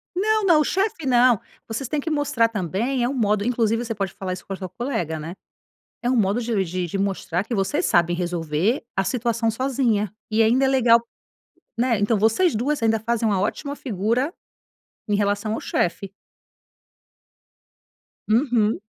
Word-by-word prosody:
Não 430 +2 +1
não, 330 -5 +5
o - - +3
chefe 385 -5 -1
não, 245 -3 +4 0.3
vocês 230 +3 -4
têm 300 - -1
que 320 - -3
mostrar 290 -6 +2
também 225 +5 -1
é 245 - +1
um - - -2
modo 210 -4 +1
inclusive 230 -1 +1
você 225 -1 -3
pode 195 -2 -3
falar 190 -2 -5
isso 180 -1 -6
com 195 - -5
a - - -3
tua 185 -2 -6
colega 200 - -3
né. 165 +3 -6 0.7
É 245 - 0
um 255 - +2
modo 210 +3 +2
de 225 -4 0
de 180 +1 -3
de 185 +4 -4
mostrar 195 -1 -1
que 235 - -3
vocês 290 - 0
sabem 175 0 +3
resolver 175 - -1
a 195 - +1
situação 235 -1 0
sozinha. 230 -4 0 0.2
E 220 +1 +3
ainda 250 +5 +3
é - - +3
legal, 245 -3 +5 0.8
né, 235 -2 +2
então 205 +2 +2
vocês 260 - +3
2 255 +4 -1
ainda 225 0 +2
fazem 230 +1 0
uma 200 -3 +1
ótima 285 +7 -2
figura 235 - -1 0.8
em 205 - +1
relação 205 +1 0
ao - - -2
chefe. 185 +2 -2 2.2
Uhum. 225 -3 +2
225 Hz, 175 wpm, -23 LUFS, 200-255 Hz, 2.2 s, não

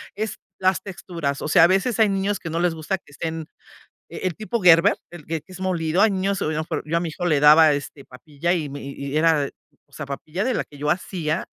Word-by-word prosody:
Es 215 +1 -3 0.2
las 185 0 +2
texturas. 170 -7 -4
O - - -3
sea, 160 - +6
a - - +8
veces 195 +5 +1
hay 215 - +5
niños 195 0 -1
que 165 - -6
no 165 +1 -2
les 175 -1 +1
gusta 160 +4 -2
que 180 - -25
estén 160 +2 -4 0.6
e - - -8
el 170 - -8
tipo 220 0 -3
Gerber, 165 -2 +6 0.2
el 175 -4 -12
que 160 -2 -3
es 185 -1 -10
molido. 175 -2 0
Hay 220 -2 +4
niños, 195 0 -1
a - - -1
lo - - 0
mejor 155 - -3
yo 165 +2 0
a - - +2
mi 170 - -2
hijo 175 +3 -4
le 150 -4 +2
daba, 150 +1 +7
este, 140 0 -5
papilla, 145 +6 -4
y 160 -5 -1
me 140 +1 -7
y 140 +1 -6
era, 155 -3 +3 0.4
o - - -35
sea, 150 - -7
papilla 155 +7 -4
de 255 0 0
la - - 0
que 145 - -16
yo 150 +1 -1
hacía, 170 -2 -2
165 Hz, 250 wpm, -23 LUFS, 150-185 Hz, 0.6 s, a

